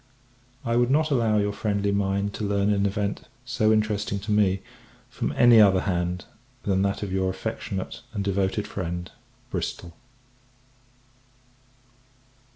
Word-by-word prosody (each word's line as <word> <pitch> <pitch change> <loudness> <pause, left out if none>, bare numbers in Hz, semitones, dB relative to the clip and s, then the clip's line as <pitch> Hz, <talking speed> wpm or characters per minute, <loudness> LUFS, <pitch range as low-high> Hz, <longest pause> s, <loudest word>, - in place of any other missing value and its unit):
I 115 0 +1
would 120 0 +3
not 155 +3 +2
allow 115 -5 +2
your 105 0 +1
friendly 100 -1 0
mind 100 0 0
to 110 - -5
learn 100 0 +1
an 100 0 +2
event 100 0 -3 0.2
so 115 -3 +2
interesting 105 -2 +1
to 105 +2 -4
me 100 -2 +3 0.5
from - - -2
any 120 -3 +7
other 95 -3 +5
hand 90 -1 -2 0.4
than 95 -1 +1
that 100 +1 0
of 100 - -4
your 95 0 +1
affectionate 95 +2 -4
and 100 -3 -3
devoted 100 +1 0
friend, 90 -1 -4 0.4
BRISTOL. 85 -1 -4
100 Hz, 135 wpm, -25 LUFS, 95-110 Hz, 0.5 s, any